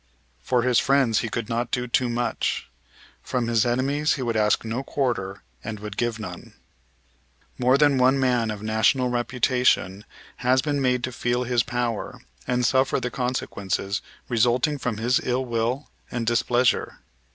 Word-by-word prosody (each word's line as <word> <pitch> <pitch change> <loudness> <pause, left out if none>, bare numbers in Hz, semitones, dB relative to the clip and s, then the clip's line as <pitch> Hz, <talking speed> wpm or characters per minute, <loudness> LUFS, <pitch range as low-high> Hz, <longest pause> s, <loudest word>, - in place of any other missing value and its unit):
For 125 -2 +1
his 125 -1 +3
friends 135 -5 +3
he 115 - -3
could 115 0 -3
not 115 +1 -2
do 125 0 -1
too 125 +1 +1
much. 120 +1 -1 0.5
From 125 -2 -2
his 115 0 +2
enemies 140 +5 +1
he 135 - -4
would 115 -2 -1
ask 105 0 +2
no 115 +3 -2
quarter 120 -9 -2 0.2
and 110 -1 -5
would 105 -1 -7
give 120 0 -1
none. 90 -5 -9 1.0
More 130 +2 +4
than 145 -2 +4
one 130 +2 +4
man 125 -4 +2
of 105 -1 -5
national 110 +4 +2
reputation 125 -5 +1 0.3
has 130 +1 +2
been 145 -2 -1
made 125 -1 +1
to 130 - -2
feel 120 0 -1
his 120 -1 +2
power, 120 -2 -3 0.3
and 125 0 +1
suffer 130 +3 +2
the 125 -1 -3
consequences 100 -6 -2 0.3
resulting 125 +5 +2
from 120 -4 -2
his 120 +3 +2
ill 130 +1 0
will 120 +4 -1 0.2
and 120 -2 -3
displeasure. 120 +1 +1
120 Hz, 160 wpm, -24 LUFS, 115-130 Hz, 1.0 s, More